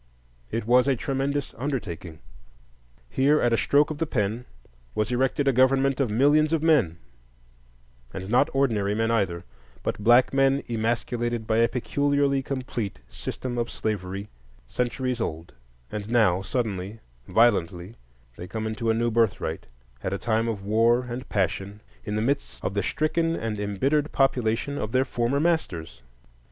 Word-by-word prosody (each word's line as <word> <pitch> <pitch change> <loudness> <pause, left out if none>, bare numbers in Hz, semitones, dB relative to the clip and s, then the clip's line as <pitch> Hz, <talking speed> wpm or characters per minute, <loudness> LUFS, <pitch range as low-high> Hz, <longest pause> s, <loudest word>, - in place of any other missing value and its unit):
It 115 - -3
was 125 +3 +4
a 135 - +3
tremendous 135 +3 -2
undertaking. 95 - -4 0.9
Here 140 - +3
at 120 -1 +2
a - - +5
stroke 145 +6 +3
of 150 - -6
the 165 - 0
pen 110 +1 -1 0.5
was 110 +3 0
erected 135 +3 +1
a 135 - +4
government 135 +2 +3
of 135 -4 +1
millions 145 +7 +3
of 160 -1 +1
men,—and - - -4
not 120 +4 +3
ordinary 110 -7 +1
men 115 +1 +1
either, 95 -7 0 0.4
but 105 - -3
black 120 +4 +5
men 135 0 +3
emasculated 120 0 -1
by 110 0 +1
a 115 - +5
peculiarly 140 +2 +1
complete 125 - -4
system 120 - -5
of 120 - -1
slavery, 100 -1 -4 0.4
centuries 125 - -2
old; 80 -6 -4 0.4
and 105 0 -5
now, 105 -6 +3
suddenly, 100 -1 -3 0.3
violently, 100 -3 +2 0.4
they 90 - -7
come 110 +3 -4
into 110 +1 -2
a 110 - +3
new 120 +1 +1
birthright, 115 -2 0 0.3
at 95 - -2
a - - -1
time 115 +2 0
of 100 -4 -3
war 115 +4 +3
and 125 +1 -6
passion, 100 +1 -1 0.3
in 105 - -3
the 110 - 0
midst 140 +4 -2
of 95 - -1
the 100 - 0
stricken 165 - 0
and 110 -5 -3
embittered 135 +9 0
population 130 +1 +1
of 110 +1 -4
their 130 +1 +3
former 120 +4 0
masters. 85 - -1
115 Hz, 150 wpm, -25 LUFS, 100-135 Hz, 0.9 s, a